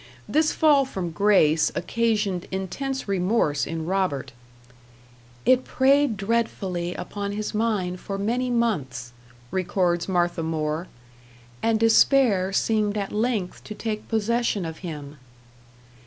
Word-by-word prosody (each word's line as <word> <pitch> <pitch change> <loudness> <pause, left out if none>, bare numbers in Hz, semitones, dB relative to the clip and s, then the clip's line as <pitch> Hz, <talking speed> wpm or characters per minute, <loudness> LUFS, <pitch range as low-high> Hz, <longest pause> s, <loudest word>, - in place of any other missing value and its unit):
This 310 +1 +2
fall 295 -3 +4
from 190 -10 -4
grace 165 -5 +3
occasioned 210 -1 0
intense 260 +9 -4
remorse 185 -6 +1
in 165 -1 -4
Robert. 185 -7 -1 1.1
"It 255 0 +4
preyed 270 -3 +3
dreadfully 195 -5 -1
upon 200 +3 -5
his 210 +2 -4
mind 210 -5 -1
for 195 +1 -5
many 240 +5 -1
months," 140 - -1 0.4
records 175 -1 0
Martha 175 -2 +1
More, 160 +1 -2 0.7
"and 225 -1 +2
despair 225 -4 +4
seemed 210 +1 +1
at 200 -1 -3
length 215 -4 -1
to 215 - -7
take 215 -1 -4
possession 225 -3 0
of 160 -1 -6
him." 150 -5 -7
200 Hz, 115 wpm, -24 LUFS, 175-230 Hz, 1.1 s, fall